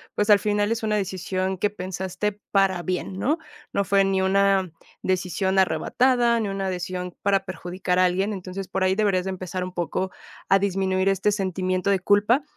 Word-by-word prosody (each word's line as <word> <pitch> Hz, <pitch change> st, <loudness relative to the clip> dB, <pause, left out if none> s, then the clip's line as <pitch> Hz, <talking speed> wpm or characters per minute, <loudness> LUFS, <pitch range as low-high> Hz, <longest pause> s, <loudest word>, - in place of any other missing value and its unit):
Pues, 210 Hz, +1 st, 0 dB
al 205 Hz, -1 st, +7 dB
final 205 Hz, +1 st, +1 dB
es 230 Hz, -, -5 dB
una 210 Hz, -1 st, +1 dB
decisión 190 Hz, -1 st, -2 dB
que 205 Hz, -, +1 dB
pensaste 190 Hz, +1 st, -3 dB, 0.2 s
para 190 Hz, -3 st, +2 dB
bien, 185 Hz, +2 st, -3 dB
¿no? 285 Hz, -, +1 dB, 0.3 s
No 200 Hz, -, 0 dB
fue 200 Hz, 0 st, +3 dB
ni 195 Hz, -1 st, +1 dB
una 195 Hz, 0 st, +3 dB, 0.3 s
decisión 185 Hz, +1 st, 0 dB
arrebatada, 235 Hz, +8 st, +3 dB
ni 210 Hz, -, -2 dB
una 195 Hz, -1 st, -2 dB
decisión 180 Hz, 0 st, -4 dB
para 195 Hz, -1 st, +1 dB
perjudicar 180 Hz, 0 st, -3 dB
a 185 Hz, -, +5 dB
alguien. 190 Hz, +3 st, +1 dB
Entonces, 190 Hz, 0 st, -6 dB
por 190 Hz, 0 st, -1 dB
ahí 185 Hz, 0 st, +2 dB
deberías 195 Hz, -3 st, +1 dB
empezar 185 Hz, -1 st, -4 dB
un 180 Hz, 0 st, -6 dB
poco 180 Hz, +2 st, -2 dB, 0.4 s
a 195 Hz, -, +5 dB
disminuir 190 Hz, -1 st, 0 dB
este 195 Hz, +1 st, +2 dB
sentimiento 185 Hz, -1 st, -1 dB
de 195 Hz, -, +2 dB
culpa, 210 Hz, +8 st, +3 dB
190 Hz, 175 wpm, -24 LUFS, 185-200 Hz, 0.4 s, al